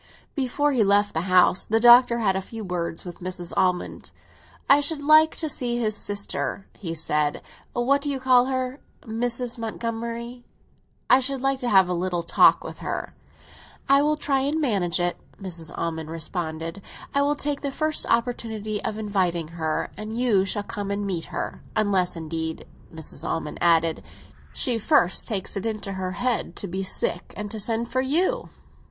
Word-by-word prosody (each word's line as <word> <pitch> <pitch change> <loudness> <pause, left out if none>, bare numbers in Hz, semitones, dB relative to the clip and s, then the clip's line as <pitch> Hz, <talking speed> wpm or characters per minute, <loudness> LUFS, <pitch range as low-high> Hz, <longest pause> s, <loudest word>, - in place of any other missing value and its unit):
Before 285 +2 0
he 245 -5 +3
left 205 +1 +3
the 165 +4 -2
house 185 0 +5
the 225 +1 +1
Doctor 240 0 +7
had 200 -5 +1
a 190 - 0
few 225 +3 -8
words 175 -3 -3
with 175 -1 -8
Mrs. 180 -1 -4
Almond. 180 -1 0 0.6
"I 285 +1 +6
should 290 0 -1
like 310 +2 +6
to 320 - -1
see 245 -4 -2
his 215 -3 0
sister," 200 -1 -3
he 165 -4 -5
said. 150 -2 0 0.3
"What 270 +4 +2
do 290 - -1
you 275 -1 -2
call 255 -1 +5
her? 260 +1 -2 0.2
Mrs. 240 +1 -2
Montgomery. 230 +2 -4 0.6
I 255 - +6
should 265 0 -1
like 270 0 +1
to 250 -2 -1
have 190 -3 +6
a 180 - -1
little 175 -1 -1
talk 170 - +5
with - - -8
her." - - -4 0.7
"I 275 +1 +6
will 300 +1 +2
try 280 -2 +1
and 285 +4 0
manage 195 - 0
it," 175 0 0 0.2
Mrs. 170 -4 -6
Almond 160 -1 -3
responded. 165 +2 -4 0.3
"I 280 - +3
will 290 +1 +2
take 290 0 -2
the 280 - -1
first 310 +2 0
opportunity 225 -3 -1
of 215 - -3
inviting 185 -6 -1
her, 160 -2 -2
and 215 +2 -6
you 225 -6 +3
shall 205 +2 -2
come 200 0 -5
and 200 0 -2
meet 180 -4 -2
her. - - -5
Unless, 195 -5 +1
indeed," 160 0 -4 0.3
Mrs. 160 -2 -5
Almond 150 -2 -3
added, 165 -1 +3 0.5
"she 240 -3 0
first 210 - +2
takes 205 -5 -3
it 195 - -3
into 210 -3 -4
her 185 -1 -3
head 245 +5 -1
to 200 - -4
be 190 +2 -3
sick 180 -2 -2
and 205 0 -5
to 220 - -4
send 230 +2 -1
for 255 +2 +1
you." 360 - 0
215 Hz, 175 wpm, -25 LUFS, 180-255 Hz, 0.7 s, Doctor